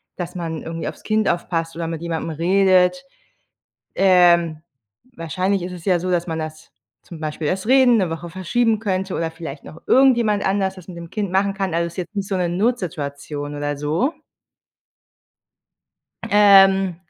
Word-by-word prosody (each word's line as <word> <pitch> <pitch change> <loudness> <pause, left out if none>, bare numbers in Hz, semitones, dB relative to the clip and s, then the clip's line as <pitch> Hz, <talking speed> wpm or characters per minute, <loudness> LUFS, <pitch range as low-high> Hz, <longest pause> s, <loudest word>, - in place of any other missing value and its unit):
dass 175 -1 -6
man 165 -3 -5
irgendwie 165 -1 -5
aufs - - -8
Kind 215 -1 0
aufpasst 165 -1 -2
oder 165 0 -4
mit 165 -1 -5
jemandem 165 -1 -3
redet. 185 - +2 0.9
Ähm, 175 -4 +4 0.6
wahrscheinlich 185 +4 -1
ist 180 +1 -5
es 175 -2 -10
ja 185 -3 +2
so, 180 - -4
dass 175 -1 0
man 160 0 -3
das 155 0 -7 0.3
zum 170 - -11
Beispiel 155 0 -4
das 190 +3 -2
Reden, 255 -2 +5
'ne 185 -6 0
Woche 165 +1 -6
verschieben 215 +5 0
könnte 190 -3 -2
oder 165 -1 -2
vielleicht 160 -4 -8
noch 165 - -12
irgendjemand 240 -6 +4
anders 190 -1 0
das 180 - -13
mit 180 - -10
dem 170 -1 -9
Kind 200 -4 -3
machen 195 +1 +2
kann. 195 -3 -3
Also 170 0 0
ist 170 - -14
jetzt 185 +3 -6
nicht 200 -1 -3
so 195 - -1
'ne 180 -2 0
Notsituation 150 - -3
oder 145 0 -3
so. 160 - -1 2.2
Ähm, 195 -3 +5
180 Hz, 170 wpm, -21 LUFS, 165-195 Hz, 2.2 s, Reden